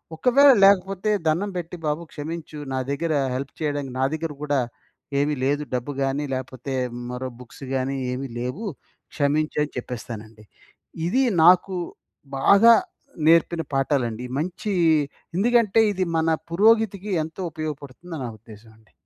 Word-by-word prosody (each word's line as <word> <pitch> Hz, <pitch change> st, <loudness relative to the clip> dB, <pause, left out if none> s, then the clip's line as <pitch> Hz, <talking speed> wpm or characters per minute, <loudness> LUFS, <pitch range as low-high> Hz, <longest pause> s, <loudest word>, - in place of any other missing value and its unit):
ఒకవేళ 275 Hz, -, +6 dB
లేకపోతే 195 Hz, +1 st, +3 dB, 0.2 s
దండం 175 Hz, +6 st, +1 dB
పెట్టి 175 Hz, 0 st, -5 dB
బాబు 150 Hz, +3 st, -1 dB
క్షమించు, 155 Hz, 0 st, -6 dB
నా 130 Hz, -, 0 dB
దగ్గర 155 Hz, +3 st, -1 dB, 0.2 s
హెల్ప్ 135 Hz, +1 st, -5 dB
చేయడానికి 145 Hz, -3 st, -2 dB
నా 130 Hz, -, +3 dB
దగ్గర 160 Hz, 0 st, -3 dB
కూడా 145 Hz, -2 st, +1 dB, 0.6 s
ఏమి 145 Hz, +1 st, +1 dB
లేదు. 145 Hz, +2 st, +1 dB
డబ్బు 125 Hz, +3 st, -3 dB
గాని 135 Hz, +2 st, -1 dB
లేపోతే, 130 Hz, +1 st, -5 dB, 0.4 s
మరో 130 Hz, +1 st, -4 dB
బుక్స్ 125 Hz, +3 st, -13 dB
గాని 135 Hz, +1 st, -1 dB, 0.2 s
ఏమి 135 Hz, +2 st, -4 dB
లేవు, 125 Hz, -, -4 dB, 0.5 s
క్షమించు 150 Hz, +1 st, 0 dB
అని 150 Hz, -, -5 dB
చెప్పేస్తానండి. 115 Hz, -3 st, -7 dB, 0.6 s
ఇది 260 Hz, +9 st, +2 dB, 0.2 s
నాకు 185 Hz, +2 st, +5 dB, 0.6 s
బాగా 210 Hz, +10 st, +7 dB, 0.5 s
నేర్పిన 165 Hz, 0 st, +4 dB
పాఠాలండి. 125 Hz, -4 st, 0 dB
మంచి 185 Hz, +6 st, -3 dB, 0.7 s
ఎందుకంటే 230 Hz, 0 st, +4 dB
ఇది 190 Hz, -2 st, -1 dB
మన 160 Hz, 0 st, +2 dB, 0.2 s
పురోగతికి 210 Hz, +1 st, +3 dB
ఎంతో 160 Hz, +4 st, -8 dB
ఉపయోగపడుతుందని 155 Hz, +1 st, -6 dB
నా 120 Hz, -, -4 dB
ఉద్దేశమండి. 110 Hz, 0 st, -17 dB
150 Hz, 125 wpm, -24 LUFS, 130-185 Hz, 0.7 s, బాగా